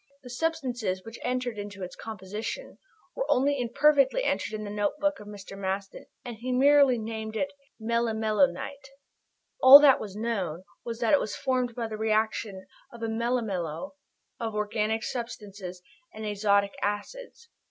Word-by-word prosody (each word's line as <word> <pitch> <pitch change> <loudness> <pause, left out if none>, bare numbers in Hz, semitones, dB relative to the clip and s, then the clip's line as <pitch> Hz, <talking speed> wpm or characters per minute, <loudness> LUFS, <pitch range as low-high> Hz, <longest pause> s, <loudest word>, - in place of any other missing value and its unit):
The 250 - -10
substances 245 - -2
which 225 +1 -9
entered 250 -3 -2
into 205 -1 -7
its 180 - -7
composition 215 - -6 0.4
were - - -3
only 280 +2 +2
imperfectly 280 - +3
entered 220 - -1
in 215 - -5
the 205 - -6
notebook 290 +9 0
of 210 - -11
Mr. 200 -1 -9
Maston, 195 0 -4 0.2
and 240 -2 -6
he 250 +3 -4
merely 275 0 +5
named 220 0 -5
it 280 +5 -1 0.3
"melimelonite." 235 +4 0 0.7
All 265 +2 +12
that 285 -3 +6
was 200 -2 -7
known 195 -7 -2 0.2
was 235 0 -6
that 230 - +2
it 290 - +6
was 215 - -3
formed 255 -3 -1
by 235 - -2
the 215 -1 -6
reaction 215 -2 -1 0.3
of 235 -1 -10
a - - 0
melimelo 225 - -2 0.5
of 225 -2 -3
organic 210 +1 -1
substances 205 -7 -6 0.3
and 220 0 -7
azotic 200 -1 +2
acids. 465 - -4
225 Hz, 150 wpm, -28 LUFS, 205-255 Hz, 0.7 s, All